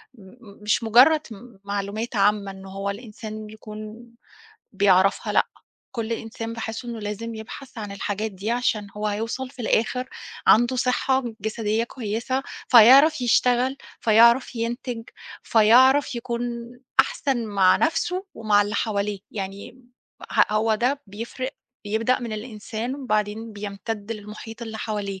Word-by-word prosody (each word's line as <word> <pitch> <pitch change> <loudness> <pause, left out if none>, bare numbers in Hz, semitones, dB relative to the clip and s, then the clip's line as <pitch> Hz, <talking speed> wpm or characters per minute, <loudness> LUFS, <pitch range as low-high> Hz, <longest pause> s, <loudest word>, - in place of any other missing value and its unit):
م 210 - -16 0.3
م 200 - -16
مش 215 +2 +1
مجرَّد 260 +8 +6
م 220 0 -12
معلومات 205 +4 -3
عامة 200 0 +2
إن 190 0 -12
هو 195 +1 -4
الإنسان 215 0 -8
يكون 215 +1 -9 0.7
بيعرفها. 195 0 +3
لأ، - - +4 0.5
كل 230 0 -2
إنسان 225 0 -5
باحِس 225 +1 -5
إنه 235 -1 -5
لازم 215 +2 -5
يبحث 230 +3 -9
عن 205 -2 -5
الحاجات 205 +2 -3
دي، 195 +4 -4
عشان 235 -4 0
هو 210 0 -2
هيوصل 230 +5 -3
في 255 -3 -9
الآخر، 250 +4 0 0.4
عنده 240 +3 +5
صحة 255 +1 +1 0.2
جسدية 220 +1 -1
كويسة، 235 +3 -3 0.3
فيعرف 265 +6 +8
يشتغل، 250 +2 +3 0.2
فيعرف 235 +3 +5
ينتج، 235 0 -3 0.4
فيعرف 255 +6 +5
يكون 235 0 -3 0.6
أحسن 270 - -1
مع 195 -3 +4
نفسه 360 +4 0
ومع 210 -2 +3
اللي 205 +1 -4
حواليه. 205 -3 -1
يعني، 200 +4 -7 0.5
ه - - +5
هو 220 +1 +2
ده 260 +6 0
بيفرِّق، 235 +6 -5 0.3
بيبدأ 225 +4 +1
من 235 -2 -5
الإنسان، 220 +2 -5
وبعدين 215 -3 -2
بيمتدّ 205 +1 -5
للمحيط 215 +2 -9
اللي 220 -1 -6
حواليه، 205 -3 -4
225 Hz, 135 wpm, -24 LUFS, 210-245 Hz, 0.7 s, فيعرف